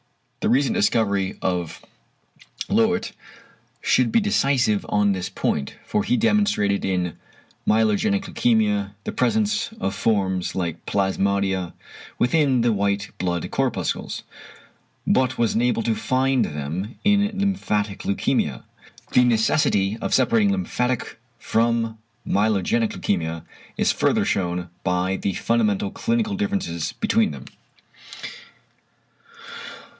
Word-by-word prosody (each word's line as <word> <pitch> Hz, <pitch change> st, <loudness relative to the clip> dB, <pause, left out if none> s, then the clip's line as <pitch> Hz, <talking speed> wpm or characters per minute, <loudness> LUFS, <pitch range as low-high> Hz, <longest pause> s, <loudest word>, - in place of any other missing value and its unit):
The -, -, 0 dB
recent 140 Hz, -, +3 dB
discovery 110 Hz, -, +1 dB
of 90 Hz, -3 st, -2 dB, 0.9 s
Löwit 225 Hz, +1 st, +1 dB, 0.7 s
should -, -, +2 dB
be 230 Hz, -, +4 dB
decisive 135 Hz, -, +2 dB
on 105 Hz, -1 st, +3 dB
this 95 Hz, -2 st, -2 dB
point, 70 Hz, -2 st, -2 dB
for 210 Hz, -1 st, 0 dB
he 250 Hz, +3 st, +1 dB
demonstrated 205 Hz, -, +2 dB
in 90 Hz, -3 st, -1 dB, 0.5 s
myelogenic 110 Hz, -, +2 dB
leukæmia 105 Hz, -, +1 dB
the -, -, -3 dB
presence 215 Hz, -, 0 dB
of 95 Hz, -, -1 dB
forms 95 Hz, -4 st, 0 dB
like 85 Hz, -4 st, -3 dB
plasmodia 95 Hz, -2 st, 0 dB, 0.4 s
within 135 Hz, -1 st, +2 dB
the 115 Hz, -1 st, +2 dB
white 100 Hz, 0 st, -1 dB
blood 90 Hz, -2 st, -2 dB
corpuscles, -, -, -2 dB, 0.8 s
but 130 Hz, 0 st, +2 dB
was 115 Hz, -2 st, +1 dB
unable 120 Hz, 0 st, +1 dB
to 115 Hz, -, +1 dB
find 130 Hz, +2 st, +1 dB
them 80 Hz, -, -4 dB
in 205 Hz, 0 st, +3 dB
lymphatic 110 Hz, -, -1 dB
leukæmia. 100 Hz, -, -1 dB, 0.5 s
The 125 Hz, -, +5 dB
necessity 110 Hz, -3 st, +2 dB
of -, -, +1 dB
separating 225 Hz, -3 st, +3 dB
lymphatic 130 Hz, -, -2 dB, 0.2 s
from 115 Hz, -1 st, 0 dB, 0.3 s
myelogenic 110 Hz, +2 st, +1 dB
leukæmia 80 Hz, -4 st, -2 dB, 0.3 s
is -, -, +3 dB
further -, -, +1 dB
shewn 90 Hz, -2 st, -1 dB
by 90 Hz, +1 st, 0 dB
the 95 Hz, -, -2 dB
fundamental 105 Hz, -4 st, +1 dB
clinical 230 Hz, -3 st, -1 dB
differences 200 Hz, -, -2 dB
between -, -, +1 dB
them. 70 Hz, -4 st, -8 dB
110 Hz, 110 wpm, -23 LUFS, 95-150 Hz, 0.9 s, The